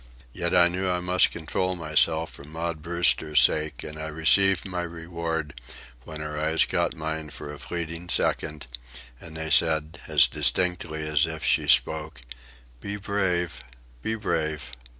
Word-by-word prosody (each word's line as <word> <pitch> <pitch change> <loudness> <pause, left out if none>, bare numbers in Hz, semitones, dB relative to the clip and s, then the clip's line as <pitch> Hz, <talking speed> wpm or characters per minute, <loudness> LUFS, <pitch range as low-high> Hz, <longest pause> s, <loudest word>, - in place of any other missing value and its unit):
Yet - - -1
I 90 -1 +7
knew 90 +2 -2
I 90 0 +1
must 90 +1 +3
control 90 +3 -2
myself 80 0 +1
for - - -10
Maud 80 +1 -5
Brewster's 85 -3 +3
sake, 75 +4 +2
and 75 0 -8
I 80 - -4
received 85 +5 +4
my 90 -2 -3
reward 80 -4 -5 0.4
when 80 -1 -8
her 75 0 -4
eyes 80 +1 +2
caught - - -1
mine 80 0 -4
for 75 - -8
a 75 - -10
fleeting 85 0 -5
second, 75 -2 0 0.5
and 80 -1 -9
they 80 0 -4
said, 80 -1 +2
as - - +5
distinctly 80 +2 0
as 75 +2 +2
if 80 -1 -6
she - - +2
spoke, 80 -3 +2 0.6
"Be 100 +10 -5
brave, 95 -7 -1 0.4
be 110 - -2
brave." 80 - -2
80 Hz, 150 wpm, -26 LUFS, 75-90 Hz, 0.6 s, I